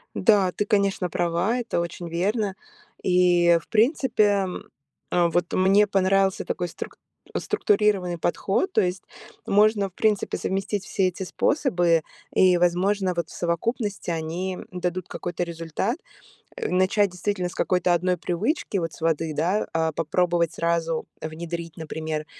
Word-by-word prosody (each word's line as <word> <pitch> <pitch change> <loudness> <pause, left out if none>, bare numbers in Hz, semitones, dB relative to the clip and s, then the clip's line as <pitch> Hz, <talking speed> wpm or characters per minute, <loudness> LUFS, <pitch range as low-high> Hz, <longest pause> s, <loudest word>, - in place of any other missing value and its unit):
Да, 200 -5 +4
ты, 205 - -1
конечно, 200 -3 +1
права. 175 +7 0
Это 225 -7 -1
очень 170 0 -5
верно. 195 +4 -1 0.5
И 175 -2 +4
в - - -22
принципе, 215 - +2 0.6
вот 175 0 +1
мне 195 +3 +4
понравился 195 -1 +2
такой 175 -1 -2
струк - - -8 0.4
структурированный 205 - +1
подход. 195 - 0
То - - +3
есть 180 0 -1 0.4
можно, 205 -1 +3
в - - -37
принципе, 210 +2 0
совместить 195 +1 -2
все 190 -3 +1
эти 185 +1 -5
способы 175 - +2 0.3
и, 185 -1 +5
возможно, 185 +2 +2
вот 170 0 -2
в - - -13
совокупности 205 +5 -2
они 170 +3 -3
дадут 180 0 -3
какой-то 175 0 -4
результат. 170 - -3 0.6
Э, - - -3
начать 190 +2 +3
действительно 180 0 -2
с - - -11
какой-то 180 -1 +1
1 180 +1 +1
привычки, 195 - -1
вот 165 -3 -2
с - - -14
воды, 160 -1 0
да, 180 +7 0
а, 160 0 +1
попробовать 170 +1 0
сразу 165 -1 -1
внедрить, 165 +1 -6
например, 155 -1 -4
180 Hz, 135 wpm, -24 LUFS, 170-200 Hz, 0.6 s, и